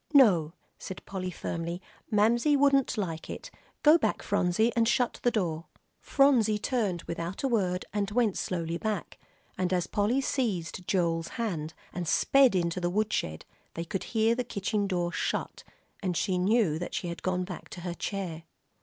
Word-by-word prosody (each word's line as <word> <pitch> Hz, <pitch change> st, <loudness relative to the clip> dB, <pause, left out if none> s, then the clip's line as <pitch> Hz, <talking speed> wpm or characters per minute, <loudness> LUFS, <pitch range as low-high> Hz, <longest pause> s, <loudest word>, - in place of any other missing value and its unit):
"No," 175 Hz, -, +6 dB, 0.3 s
said 190 Hz, -, -8 dB
Polly, 185 Hz, -2 st, -4 dB
firmly, 170 Hz, 0 st, -4 dB, 0.3 s
"Mamsie 235 Hz, +7 st, +3 dB
wouldn't 275 Hz, -3 st, +3 dB
like 165 Hz, -6 st, -3 dB
it. -, -, -7 dB, 0.3 s
Go 305 Hz, +3 st, +7 dB
back, -, -, 0 dB
Phronsie, 205 Hz, +3 st, +2 dB
and 230 Hz, -1 st, +3 dB
shut 245 Hz, +1 st, +1 dB
the 245 Hz, -, +3 dB
door." 170 Hz, -8 st, -1 dB, 0.3 s
Phronsie 245 Hz, -7 st, +3 dB
turned 210 Hz, -7 st, -1 dB
without 170 Hz, +5 st, -5 dB
a -, -, +3 dB
word 190 Hz, -7 st, 0 dB
and 205 Hz, -1 st, 0 dB
went 220 Hz, -2 st, +2 dB
slowly 170 Hz, -2 st, -2 dB
back, 215 Hz, -4 st, -3 dB, 0.4 s
and 185 Hz, -1 st, 0 dB
as 180 Hz, -2 st, +1 dB
Polly 215 Hz, +6 st, +1 dB
seized 195 Hz, -, -2 dB
Joel's 165 Hz, -3 st, +1 dB
hand 165 Hz, -9 st, -3 dB, 0.2 s
and 175 Hz, -1 st, -4 dB
sped 270 Hz, -, +4 dB
into 170 Hz, 0 st, 0 dB
the 175 Hz, -, +1 dB
woodshed, 180 Hz, -, -1 dB, 0.3 s
they 165 Hz, -, -3 dB
could 195 Hz, +2 st, -4 dB
hear 225 Hz, 0 st, +2 dB
the 250 Hz, +1 st, -1 dB
kitchen 205 Hz, -2 st, -1 dB
door 175 Hz, -2 st, -1 dB
shut, -, -, -2 dB, 0.4 s
and 180 Hz, -4 st, -1 dB
knew 185 Hz, -2 st, +2 dB
that 175 Hz, -, -5 dB
she 180 Hz, -, -2 dB
had 170 Hz, 0 st, -5 dB
gone 185 Hz, 0 st, 0 dB
back 180 Hz, -2 st, -8 dB
to 175 Hz, -, -8 dB
her 175 Hz, 0 st, -3 dB
chair. 175 Hz, -4 st, -4 dB
190 Hz, 165 wpm, -29 LUFS, 175-225 Hz, 0.4 s, Go